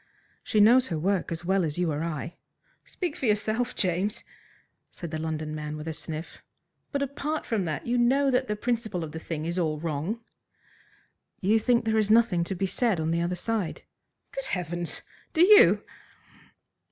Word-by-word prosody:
"She 215 - +1
knows 245 +5 +6
her 165 - -2
work 185 +3 0
as 165 +1 -4
well 190 +1 +2
as 155 -1 -2
you 175 -2 +1
or 150 +2 -2
I." 165 0 -4 0.5
"Speak 350 -5 -4
for 260 - -2
yourself, 220 +4 0
James," 185 +3 0 0.7
said 170 -3 -8
the 155 - -3
London 155 -1 -3
man 150 0 -5
with 150 +1 -7
a 160 - -2
sniff. 155 +1 -6 0.5
"But 280 -1 0
apart 290 +3 -3
from 210 -5 -1
that, 155 -3 -3
you 240 +1 +1
know 270 +3 +3
that 255 +1 +1
the 210 - -1
principle 220 -5 -2
of 155 - -6
the 160 - -6
thing 160 -1 -4
is 170 +2 -1
all 155 -3 0
wrong." 165 +7 -2 1.2
"You 215 +3 +3
think 235 +1 +2
there 220 0 +2
is 215 -1 +1
nothing 220 -6 +4
to 190 - -3
be 195 +2 -1
said 210 -1 +1
on 160 +1 0
the 170 +1 +1
other 175 +1 -1
side?" 210 -1 -2 0.5
"Good - - -5
heavens! 175 -1 -3 0.3
do 330 +2 +7
you?" 425 +2 +7
185 Hz, 185 wpm, -27 LUFS, 160-235 Hz, 1.2 s, do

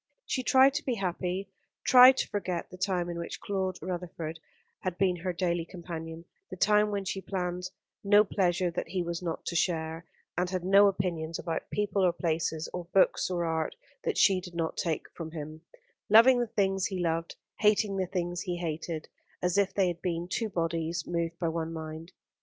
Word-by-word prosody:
She 255 - -1
tried 265 +1 +5
to 300 +2 -2
be 255 - -1
happy, 185 0 -3 0.3
tried 255 +1 +9
to - - 0
forget 185 -4 -3
the - - -8
time 185 -2 0
in 170 -1 -4
which 170 - -5
Claude 190 -2 -2
Rutherford 170 -3 -5 0.4
had 185 -2 -3
been 185 -2 +2
her 180 +2 -2
daily 175 -1 0
companion, 165 -2 -7 0.2
the - - -6
time 210 +2 +4
when 200 -1 -2
she 190 +1 -3
planned 180 -2 -3 0.3
no 205 +1 +6
pleasure 180 -3 +1
that 170 - -3
he 185 -2 -2
was 170 0 -4
not 170 -2 -4
to 170 - -3
share, 165 -1 -1 0.3
and 180 +1 0
had 185 -1 -2
no 200 +2 +6
opinions 170 -4 -1
about 165 -2 -4
people 205 -1 0
or 180 -2 +4
places, 160 -2 -1
or 180 -1 -4
books 185 +2 +3
or 175 -2 -1
art, 160 -1 -1 0.3
that 450 - -1
she 195 -3 +5
did 180 -1 -10
not 165 -1 -1
take 165 -3 -1
from 165 -2 -6
him: 155 0 -7 0.5
loving 235 +4 +7
the 240 - 0
things 195 -3 +1
he 190 -2 -4
loved, 165 -1 -1 0.2
hating 210 -1 +3
the 185 -1 0
things 175 -1 -2
he 180 -1 -3
hated; 165 -1 -4 0.4
as 180 -1 +1
if 200 -1 +3
they 195 -2 +2
had 175 -1 -3
been 170 -1 -2
two 220 +4 -2
bodies 165 -2 -2
moved 170 -1 -2
by 170 - -1
one 165 0 -2
mind. 160 +1 -7
180 Hz, 195 wpm, -29 LUFS, 165-195 Hz, 0.5 s, tried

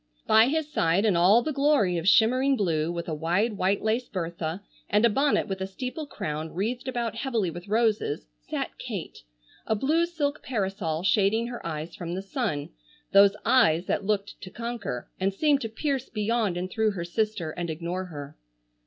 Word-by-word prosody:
By 220 +2 +6
his 305 +1 -1
side 170 +5 +2
in 205 -5 +3
all 195 +8 +5
the 310 - -2
glory 275 -10 +3
of 165 - -4
shimmering 255 +7 +5
blue 165 -5 0
with 170 -1 -4
a 160 - -2
wide 175 +9 +1
white 195 0 0
lace 225 +3 0
bertha 170 -1 -4 0.3
and 210 +3 +4
a 235 - +4
bonnet 280 +6 +2
with 190 -1 -4
a 190 - -1
steeple 255 +9 -5
crown 155 - -4
wreathed 235 +7 -2
about 235 -3 -2
heavily 230 -8 -1
with 175 +3 -9
roses 215 - +1
sat - - -5
Kate, - - -6 0.5
a 220 - +2
blue 315 +9 +2
silk 300 -4 -2
parasol 195 -8 -2
shading 205 +3 +3
her 240 - -7
eyes 160 0 -5
from 175 0 -5
the 190 - -4
sun, 195 - -2 0.4
those 200 0 +6
eyes 175 -9 +4
that - - -1
looked 200 0 -2
to 185 - -8
conquer, 230 - -5
and 190 +1 0
seemed 290 +2 +3
to 225 - -3
pierce 270 +3 -2
beyond 215 -3 0
and 185 +1 -4
through 220 -2 +1
her 170 -3 -4
sister 195 -3 -1
and 175 +1 -4
ignore 170 +4 -3
her. 145 -5 -8
205 Hz, 185 wpm, -27 LUFS, 175-240 Hz, 0.5 s, By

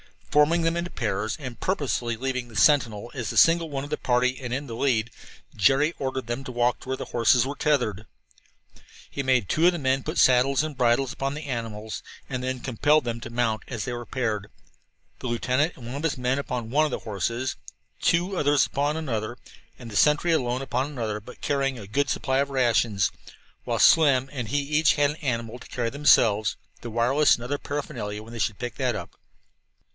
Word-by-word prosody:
Forming 150 +3 +4
them 165 +1 +1
into 175 +1 -3
pairs, 110 - -2
and 130 -5 -8
purposely 135 -10 -1
leaving 125 0 -3
the 115 - -14
sentinel 115 0 +3
as 120 -7 -4
the - - -4
single 165 0 +5
one 135 -2 -3
of 145 - -7
the - - -2
party 125 0 +1
and 125 -3 -6
in 140 +3 -2
the 115 -4 -7
lead, 120 -4 +1 0.4
Jerry 140 - +3
ordered 130 -2 -3
them 120 +3 -4
to 125 - -6
walk 120 +1 +1
toward - - -14
where 130 0 -2
the - - -7
horses 120 +1 +4
were 140 +2 -4
tethered. 120 -9 0 1.1
He 140 - -3
made 130 -6 +2
two 165 +2 +3
of 180 - +4
the - - -2
men 135 -3 0
put - - -4
saddles 130 +3 +4
and 155 -3 -5
bridles 125 +2 +2
upon 135 0 -2
the 150 +2 -6
animals, 115 -4 -5 0.3
and 125 -1 -3
then 130 -1 -3
compelled 145 +5 +2
them 120 -1 -3
to 120 - -8
mount 115 -2 -1
as 120 -6 -4
they 125 - -4
were 120 0 -5
paired 110 -6 -2 0.7
the - - -5
lieutenant 130 +7 0
and 120 - -12
one 120 +3 -6
of 145 - -5
his 165 -5 0
men 125 +2 0
upon 120 -5 -4
one 155 +3 +4
of 150 - -2
the - - -2
horses, 115 +5 -3 0.4
two 180 +3 +1
others 145 -3 +3
upon 145 +2 -1
another, 120 -6 -3 0.4
the 115 -4 -9
sentry 150 +8 +4
alone 125 -5 0
upon 130 0 -1
another, 110 -7 -3
but 110 +4 -13
carrying 135 -2 0
a 105 - -8
good 140 +7 0
supply 130 0 0
of 140 0 0
rations 120 -6 +2 0.5
while - - -1
Slim 135 -5 +5
and 125 -5 -4
he 145 +6 0
each 150 +2 +2
had 145 0 +2
an - - -7
animal 120 -5 -3
to - - -13
carry 120 -2 -2
themselves, 110 -7 +4 0.2
the 120 - -7
wireless 125 +6 +3
and 120 - -9
other 140 +4 -2
paraphernalia 105 -7 -5
when 115 +2 -12
they 115 - -6
should 105 -1 0
pick 120 -2 -5
that - - 0
up. - - -6
130 Hz, 210 wpm, -25 LUFS, 115-145 Hz, 1.1 s, single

